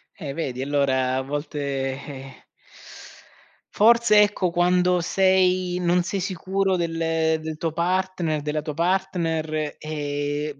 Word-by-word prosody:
Eh 145 -7 -6
vedi 130 -6 -3
allora 135 -2 +1
a - - 0
volte 145 +2 -5 0.5
eh 135 -2 -10 1.3
forse 225 -1 +5
ecco, 200 -3 0
quando 180 +1 +2
sei 185 0 +2
non 175 0 +2
sei 195 +3 -3
sicuro 190 +1 -1
del 170 -2 -2 0.4
del 155 0 -6
tuo 165 0 -2
partner, 175 -2 -1
della 150 +1 -3
tua 150 -1 -4
partner, 165 -3 -1
ehm, 145 -1 -3
165 Hz, 120 wpm, -23 LUFS, 145-185 Hz, 1.3 s, forse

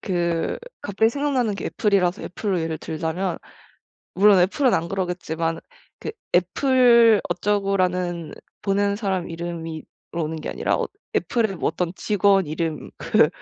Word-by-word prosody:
그 170 -3 -1 0.2
갑자기 220 +3 +1
생각나는게 255 -7 -1
애플이라서 195 -3 +1
애플로 190 +1 -2
예를 160 0 -2
들자면 165 +3 -3 0.8
물론 200 +1 +6
애플은 225 +8 +3
안그러겠지만 170 -2 -1 0.4
그 - - -5 0.2
애플 235 +3 +5
어쩌고라는 185 -4 0 0.3
보낸 200 0 +1
사람 195 -4 -2
이름으로 165 -1 -5 0.3
오는 160 -1 -2
게 - - -6
아니라 - - 0
어 - - -1 0.3
애플의 220 -6 0
어떤 170 +2 -1
직원 200 -3 +3
이름 155 0 -3
그 - - +4
185 Hz, 295 characters per minute, -23 LUFS, 170-205 Hz, 0.8 s, 물론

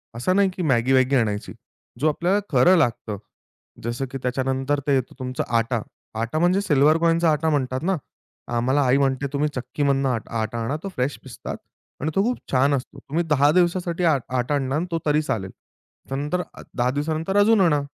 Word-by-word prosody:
असं 125 +11 0
नाही 200 -1 +4
की 180 - -4
मॅगी-वॅगी 130 -1 +3
आणायची. 105 -5 0 0.5
जो 155 - +2
आपल्याला 175 +6 +1
खरं 165 +8 +5
लागतं, 115 -8 0 0.7
जसं 120 +3 -2
की 135 - -4
त्याच्यानंतर 135 +2 0
ते 140 - +4
येतं 130 -2 -2
तुमचा 130 0 -3
आटा. 115 0 0 0.4
आटा 115 +7 -1
म्हणजे 180 +4 +3
सिल्व्हर 150 -3 +4
कॉइनचा 165 0 +3
आटा 155 +1 +1
म्हणतात 130 -3 -1
ना, 190 +2 +1 0.6
आम्हाला 130 +5 +2
आई 130 +2 +4
म्हणते, 140 0 +1
"तुम्ही 150 +1 +1
चक्कीमधनं 135 +2 0
आट 115 -4 -2
आटा 115 0 -2
आणा 130 +6 -2
तो 195 - -4
फ्रेश 130 +3 -1
पिसतात 130 -3 -7 0.4
आणि 155 +3 -1
तो 195 - +3
खूप 245 +2 0
छान 140 +2 +3
असतो. 135 +1 -4
तुम्ही 160 +6 -2
10 145 0 +4
दिवसासाठी 175 0 +1
आ 160 -4 +4 0.2
आटा 125 +4 0
आणणार 135 +1 0
ना 170 - -2
तो 165 - 0
तरी 150 0 +3
चालेल. 100 -10 -3 0.6
त्यानंतर 145 +6 -1
अ, - - -11
10 125 0 +1
दिवसानंतर 160 +7 -1
अजून 210 0 +5
आणा." 150 -5 +3
140 Hz, 185 wpm, -23 LUFS, 130-165 Hz, 0.7 s, खरं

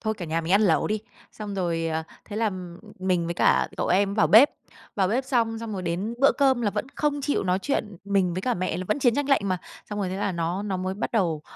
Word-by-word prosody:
"Thôi, 220 -1 -1
cả 195 -5 -6
nhà 165 0 -1
mình 165 +2 -2
ăn 205 +2 +5
lẩu 165 -6 +3
đi." 215 0 -1 0.3
Xong 210 -2 -6
rồi, 170 -3 -1
à, 160 0 -2 0.2
thế 210 - -7
là 220 -1 +1
m 180 -2 -8 0.2
mình 185 -2 0
với 170 - -3
cả - - +3
cậu - - -1
em 195 +2 +3
ấy - - -4
vào 215 - +4
bếp. 235 +7 +7 0.5
Vào 190 -2 +2
bếp 250 +5 0
xong, 230 -4 0
xong 225 -2 -6
rồi 190 - -4
đến 180 +6 -2
bữa 275 - +6
cơm 265 -3 +3
là 205 - +1
vẫn 210 +4 -3
không 290 -1 0
chịu 285 -8 0
nói 185 +1 +1
chuyện 210 -8 -2
mình 195 -3 +1
với 185 - -3
cả 250 +2 0
mẹ 180 -2 -2
là 185 - -4
vẫn 210 - +1
chiến 245 -4 +3
tranh 290 +1 -1
lạnh 275 - +4
mà. 185 -2 0 0.3
Xong 210 - -3
rồi 195 -3 -1
thế 185 - -4
là 200 -1 -1
nó 170 +3 -2
nó 200 -2 -2
mới 185 +1 -3
bắt 210 - -4
đầu 170 -9 0
200 Hz, 280 wpm, -25 LUFS, 180-225 Hz, 0.5 s, bếp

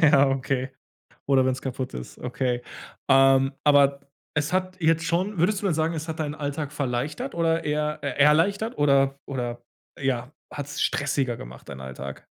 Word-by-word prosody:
Ja, 140 -3 +6
okay. 135 0 -1 0.6
Oder 135 -2 +5
wenn's 130 0 -1
kaputt 130 - -4
ist, 60 -1 -8
okay. 125 -1 -2 0.5
Ähm, 135 0 +5
aber 140 -1 +5 0.4
es 150 +3 0
hat 185 0 -1
jetzt 165 0 +2
schon 180 +4 0
würdest 190 +4 +2
du 205 - -1
denn 170 - +2
sagen, 160 +1 0
es 160 +1 -5
hat 160 - -4
deinen 150 -1 -2
Alltag 145 -1 -4
verleichtert 145 - -3
oder 165 0 +1
eher 150 0 -1
äh, 140 - -1
erleichtert, 165 +9 +3
oder 140 -1 +3
oder 120 -3 -4 0.4
ja 130 -1 -1 0.2
hat's 145 +1 -5
stressiger 140 -5 0
gemacht, - - -11
deinen 70 -1 -8
Alltag? 65 -1 -7
145 Hz, 165 wpm, -25 LUFS, 130-160 Hz, 0.6 s, Ja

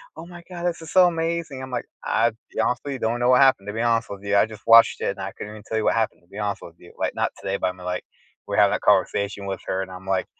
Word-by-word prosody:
"Oh 160 - -9
my 175 0 -11
god, 175 -1 -6
this 170 -2 -1
is 160 - -9
so 185 +3 +7
amazing." 165 -4 -1
I'm 130 - -7
like, 125 -2 -3 0.2
"I, 115 +1 +2
to - - -23 0.2
be - - -6
honest 125 - +1
with 140 - -4
you, 130 - -5
don't 115 +2 -1
know 120 +1 +2
what 125 +1 +6
happened, 130 -7 +4
to 105 - -4
be 115 - -2
honest 115 0 +1
with 100 0 -8
you. 100 0 0
I 105 - +4
just 110 -1 -12
watched 115 0 +7
it, - - 0
and 100 - -10
I 95 0 -4
couldn't 105 +1 -8
even 105 0 -11
tell 110 - -2
you 110 - 0
what - - +3
happened, 115 -5 -1
to - - -29
be 100 +3 -9
honest 105 -1 -2
with 85 - -11
you." 90 - -16
Like, - - -1
not - - -1
today, 100 0 -2
but - - 0
I - - 0
mean, 90 -1 -12
like, 90 0 -3 0.4
we - - -2
had - - +6
that - - -1
conversation 100 0 +1
with 95 0 -3
her 95 - -1
and 95 - -10
I'm 95 +1 -10
like, 95 -1 +1
110 Hz, 330 wpm, -23 LUFS, 100-130 Hz, 0.4 s, so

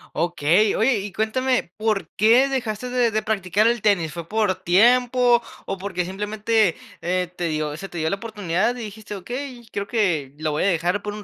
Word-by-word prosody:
Okey. 175 +5 +2
Oye, 225 -1 +2
y 200 +1 -6
cuéntame, 245 -1 0
¿por 215 -6 -1
qué 235 +6 +5
dejaste 250 -2 -3
de 245 -2 +2
de 215 0 0
practicar 210 0 +1
el 235 -2 +1
tenis? 185 -7 +2
¿Fue 165 +1 -7
por 210 -2 +1
tiempo 240 +6 +4 0.3
o 195 - -3
porque 185 -2 -3
simplemente, 210 +1 0 0.3
eh, 180 0 -1
te 175 - -3
dio 155 -1 -2
se 195 +3 -8
te 175 - -6
dio 160 0 0
la - - 0
oportunidad 210 0 -1
y - - -8
dijiste: 210 0 -8
"Okey, 245 +4 -7
creo 200 0 -3
que 170 - 0
lo 155 0 -1
voy 150 - -1
a - - +2
dejar 180 +2 0
por 210 - -4
un 210 0 -8
205 Hz, 200 wpm, -23 LUFS, 175-230 Hz, 0.3 s, qué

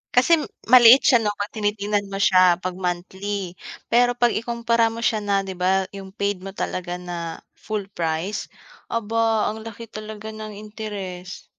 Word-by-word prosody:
Kasi 305 +6 +5 0.3
maliit 245 +1 +10
siya 240 -4 +6
'no, 210 - +1
'pag 205 +1 -4
tinitingnan 205 -1 -1
mo 195 - -4
siya 185 -3 +5
'pag 185 0 -4
monthly, 185 +1 -4 0.4
pero 245 0 +4
'pag 240 -1 +3
ikumpara 235 0 +1
mo 230 +1 -6
siya 215 -2 +1
na 200 -1 0
'di 190 - -5
ba 185 +1 +1
'yong 195 -1 -8
paid 200 -2 -1
mo 195 - -7
talaga 180 -2 -4
na 175 -1 -6 0.4
full 210 -2 -4
price 170 +5 -2 0.4
aba 225 -1 +1
ang 220 - -8
laki 225 +1 -8
talaga 215 0 -8
ng 215 -1 -7
interest. 205 -4 -7
205 Hz, 160 wpm, -23 LUFS, 190-225 Hz, 0.4 s, maliit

